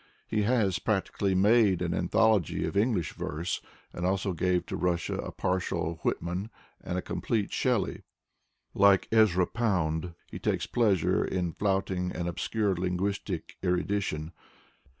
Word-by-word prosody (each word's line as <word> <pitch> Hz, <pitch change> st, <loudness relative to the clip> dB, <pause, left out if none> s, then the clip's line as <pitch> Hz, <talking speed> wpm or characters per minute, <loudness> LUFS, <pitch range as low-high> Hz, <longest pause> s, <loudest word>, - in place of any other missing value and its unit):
He 105 Hz, -, 0 dB
has 105 Hz, -4 st, +2 dB
practically 100 Hz, -1 st, 0 dB
made 100 Hz, -1 st, +4 dB
an 85 Hz, -1 st, -1 dB
anthology 105 Hz, -1 st, +2 dB
of -, -, -4 dB
Eng 110 Hz, +4 st, +3 dB
lish 85 Hz, -5 st, -2 dB
verse, 85 Hz, +4 st, -3 dB, 0.3 s
and 90 Hz, -, -5 dB
also 95 Hz, +1 st, 0 dB
gave 90 Hz, +1 st, +1 dB
to -, -, -4 dB
Russia 85 Hz, -2 st, 0 dB
a -, -, -4 dB
partial 85 Hz, -3 st, -2 dB
Whitman 90 Hz, +5 st, -2 dB, 0.3 s
and 90 Hz, -, -3 dB
a 90 Hz, -, -2 dB
complete 110 Hz, -4 st, -2 dB
Shelley, -, -, 0 dB, 0.7 s
Lite 100 Hz, -1 st, +5 dB
Ezra 105 Hz, -5 st, +4 dB
Pound, 90 Hz, -7 st, -1 dB
he -, -, -8 dB
takes -, -, 0 dB
pleasure 105 Hz, -7 st, +2 dB
ia 90 Hz, -2 st, -1 dB
flaunting 95 Hz, -2 st, 0 dB
an 85 Hz, +1 st, -2 dB
obscure 100 Hz, +4 st, 0 dB
linguistic 90 Hz, 0 st, -2 dB
erudition. 90 Hz, -3 st, -1 dB
95 Hz, 135 wpm, -29 LUFS, 90-105 Hz, 0.7 s, Lite